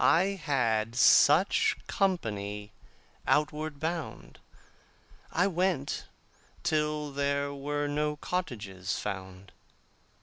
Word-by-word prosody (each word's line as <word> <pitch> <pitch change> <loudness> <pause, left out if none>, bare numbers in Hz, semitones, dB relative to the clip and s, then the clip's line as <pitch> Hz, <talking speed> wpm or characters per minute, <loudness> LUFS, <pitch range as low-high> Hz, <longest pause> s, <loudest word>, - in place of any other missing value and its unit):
I 180 +4 +5
had 115 -6 +1
such 150 +8 +5
company 105 - -1 0.6
outward 150 0 0
bound. 165 +1 -4 0.9
I 180 - +2
went 180 -6 0 0.6
till 150 -2 0
there 140 0 -1
were 145 +1 -2
no 150 +1 0
cottages 105 - -3
found. 95 0 -6
145 Hz, 80 wpm, -29 LUFS, 110-155 Hz, 0.9 s, I